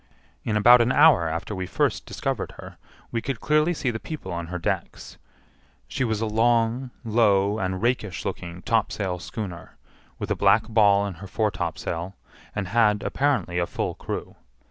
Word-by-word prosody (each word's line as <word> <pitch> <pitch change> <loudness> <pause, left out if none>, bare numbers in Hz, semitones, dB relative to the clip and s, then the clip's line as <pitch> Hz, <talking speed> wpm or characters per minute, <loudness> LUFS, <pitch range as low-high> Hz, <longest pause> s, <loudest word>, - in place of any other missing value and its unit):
In 105 -2 0
about 120 +3 +7
an 120 +2 +2
hour 85 -9 +5
after 80 +6 -4
we 95 -2 -4
first - - 0
discovered - - -3
her, - - -11 0.3
we 115 - -1
could 135 -3 -4
clearly 150 +3 +2
see 140 -7 -1
the 110 - -5
people 155 +4 -7
on 85 -1 -4
her 90 +1 -4
decks. 85 - -4 0.7
She 65 - -2
was 110 -3 -1
a - - +1
long, 115 +3 +1
low, 105 -2 +2
and 95 +1 -2
rakish 115 -7 -1
looking 85 +1 -5
topsail 100 -5 0
schooner, 95 -2 -7 0.4
with - - -5
a - - +2
black 100 +2 +3
ball 105 -3 +4
in 100 - -4
her 95 - -7
foretopsail, 90 -3 -2 0.4
and 100 -3 -3
had, 105 -1 +3
apparently, 135 -11 0
a 85 - 0
full - - -3
crew. - - -6
105 Hz, 165 wpm, -25 LUFS, 95-115 Hz, 0.7 s, about